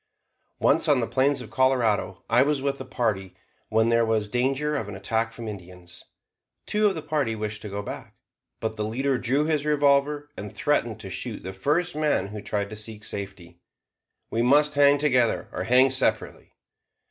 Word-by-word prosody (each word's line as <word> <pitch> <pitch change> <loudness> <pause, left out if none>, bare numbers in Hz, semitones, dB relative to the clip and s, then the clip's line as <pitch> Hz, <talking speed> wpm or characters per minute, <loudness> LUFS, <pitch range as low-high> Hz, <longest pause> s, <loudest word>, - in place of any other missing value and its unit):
Once, - - +2
on - - +4
the - - 0
plains 140 +2 +1
of - - -10
Colorado, 120 -8 +1
I 120 +2 +4
was 145 +1 +2
with 140 0 -2
a - - -6
party 105 -8 -2 0.3
when 110 +1 +2
there 115 0 +3
was 110 -2 0
danger 135 +6 0
of 110 -8 -3
an 100 - -7
attack 110 +4 -1
from 115 -1 -8
Indians. 90 -3 -10 0.6
Two 210 0 +2
of 195 - 0
the 160 - -5
party 140 -9 -1
wished 105 -1 -4
to 105 - -7
go 100 +1 -4
back; - - -8 0.4
but 110 -1 -3
the 105 - -1
leader 130 +4 -1
drew 135 +5 +1
his 155 -2 0
revolver 145 0 +2
and 105 -1 -7
threatened 145 -8 0
to 95 - -8
shoot - - -5
the 95 - -6
first 150 - 0
man 150 -11 0
who 105 0 -7
tried 100 0 -3
to - - -6
seek 105 0 -7
safety. 95 -5 -6 0.7
"We 115 - 0
must 145 +4 +4
hang 145 0 +5
together 130 -5 +1
or - - -4
hang 130 +2 +5
separately." 130 - -1
120 Hz, 185 wpm, -25 LUFS, 105-140 Hz, 0.7 s, hang